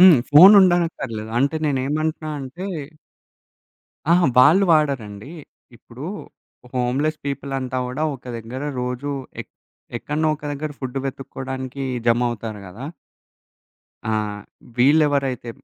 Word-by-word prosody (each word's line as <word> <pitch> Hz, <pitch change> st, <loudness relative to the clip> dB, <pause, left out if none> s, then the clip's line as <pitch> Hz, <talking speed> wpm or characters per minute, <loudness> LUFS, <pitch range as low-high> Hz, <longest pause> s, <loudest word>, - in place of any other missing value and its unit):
హ్మ్. 185 Hz, -3 st, +9 dB
ఫోనుండనక్కర్లేదు. 170 Hz, -, +6 dB
అంటే 140 Hz, +5 st, +1 dB
నేనేమంటున్నా 155 Hz, +3 st, -1 dB
అంటే 135 Hz, +8 st, -7 dB, 1.5 s
ఆహా! 175 Hz, -1 st, +4 dB
వాళ్ళు 155 Hz, +10 st, +7 dB
వాడరండి. 135 Hz, -6 st, 0 dB, 0.5 s
ఇప్పుడు 120 Hz, +4 st, -11 dB, 0.7 s
హోమ్ 125 Hz, 0 st, 0 dB
లెస్ 155 Hz, 0 st, 0 dB
పీపుల్ 140 Hz, 0 st, -4 dB
అంతా 130 Hz, -1 st, -3 dB
గూడా 130 Hz, +5 st, -4 dB
ఒక 130 Hz, -, -12 dB
దగ్గర 115 Hz, +3 st, -7 dB, 0.2 s
రోజు 125 Hz, +3 st, -3 dB, 0.3 s
ఎక్ -, -, -10 dB, 0.5 s
ఎక్కడనో 150 Hz, +6 st, -1 dB
ఒక 150 Hz, -, -30 dB
దగ్గర 150 Hz, +2 st, -4 dB
ఫుడ్ 130 Hz, -1 st, -6 dB
వెతుక్కోడానికి 130 Hz, 0 st, -6 dB, 0.2 s
జమవుతారు 115 Hz, -3 st, 0 dB
గదా! 110 Hz, +10 st, -8 dB, 1.2 s
ఆ! -, -, 0 dB, 0.7 s
వీళ్ళెవరైతే 140 Hz, -3 st, +2 dB
135 Hz, 105 wpm, -22 LUFS, 125-155 Hz, 1.5 s, హ్మ్